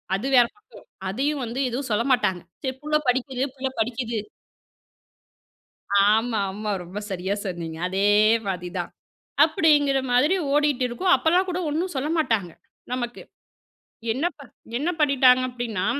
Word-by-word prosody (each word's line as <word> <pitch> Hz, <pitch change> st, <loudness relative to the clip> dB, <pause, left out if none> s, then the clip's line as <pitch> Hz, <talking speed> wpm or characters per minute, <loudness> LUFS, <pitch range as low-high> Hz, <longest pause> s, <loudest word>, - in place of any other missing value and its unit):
அது 200 Hz, +6 st, -4 dB
வேற 245 Hz, -, +7 dB
பக்கம். 415 Hz, -, -17 dB, 0.2 s
அதையும் 275 Hz, +7 st, -1 dB
வந்து 235 Hz, +3 st, -5 dB
எதும் 255 Hz, +2 st, -4 dB
சொல்ல 210 Hz, +2 st, +2 dB
மாட்டாங்க. 190 Hz, -8 st, +2 dB, 0.2 s
சரி 260 Hz, -1 st, -2 dB
புள்ள 305 Hz, +1 st, -1 dB
படிக்குது, 260 Hz, +1 st, 0 dB
புள்ள 265 Hz, 0 st, -2 dB
படிக்குது. 230 Hz, -1 st, -1 dB, 1.9 s
ஆமாமா. 215 Hz, -2 st, -1 dB
ரொம்ப 185 Hz, +4 st, -7 dB
சரியா 190 Hz, +2 st, -2 dB
சொன்னீங்க. 170 Hz, -4 st, -5 dB
அதே 195 Hz, +2 st, +1 dB, 0.4 s
மாரி 180 Hz, -2 st, -3 dB
தான். -, -, -4 dB, 0.5 s
அப்பிடிங்கிற 295 Hz, -3 st, +3 dB
மாதிரி 290 Hz, +9 st, +4 dB, 0.2 s
ஓடிட்டு 290 Hz, -3 st, +2 dB
இருக்கும். 360 Hz, +10 st, +1 dB
அப்பல்லாம் 355 Hz, +4 st, +2 dB
கூட 355 Hz, -, -2 dB
ஒன்னும் 340 Hz, +4 st, -2 dB
சொல்ல 270 Hz, +3 st, -1 dB
மாட்டாங்க 220 Hz, -, 0 dB, 0.4 s
நமக்கு. 240 Hz, -1 st, -4 dB, 0.9 s
என்ன 270 Hz, +8 st, -2 dB
ப -, -, -13 dB, 0.4 s
என்ன 295 Hz, +7 st, -1 dB
பண்ணிட்டாங்க. 260 Hz, -3 st, +5 dB
அப்பிடின்னா 235 Hz, -6 st, -3 dB
250 Hz, 130 wpm, -24 LUFS, 210-290 Hz, 1.9 s, வேற